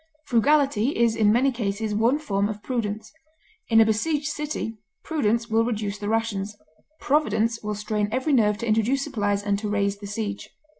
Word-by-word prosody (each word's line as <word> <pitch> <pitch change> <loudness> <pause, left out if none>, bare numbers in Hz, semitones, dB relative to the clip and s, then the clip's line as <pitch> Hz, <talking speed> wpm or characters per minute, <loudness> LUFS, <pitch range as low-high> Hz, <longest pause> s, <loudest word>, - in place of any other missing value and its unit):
Frugality 275 0 +2
is 230 -1 +3
in 215 -2 +4
many 255 +5 +3
cases 215 -2 -2
one 230 +6 +2
form 205 -9 -1
of 210 -1 -6
prudence. 220 -3 -3 0.6
In 225 -1 +5
a 225 - +7
besieged 285 +8 0
city 295 -7 -4 0.2
prudence 235 -7 0
will 225 0 +2
reduce 210 -3 -3
the 205 0 -3
rations, 210 -2 -1 0.4
providence 230 -6 +1
will 210 0 -3
strain 210 0 -2
every 260 +5 0
nerve 210 -5 +3
to 235 +2 -4
introduce 225 +5 +2
supplies 205 -8 -1
and 200 -1 0
to 210 0 -3
raise 200 -1 0
the 205 - -7
siege. 205 -1 -4
220 Hz, 170 wpm, -24 LUFS, 210-245 Hz, 0.6 s, a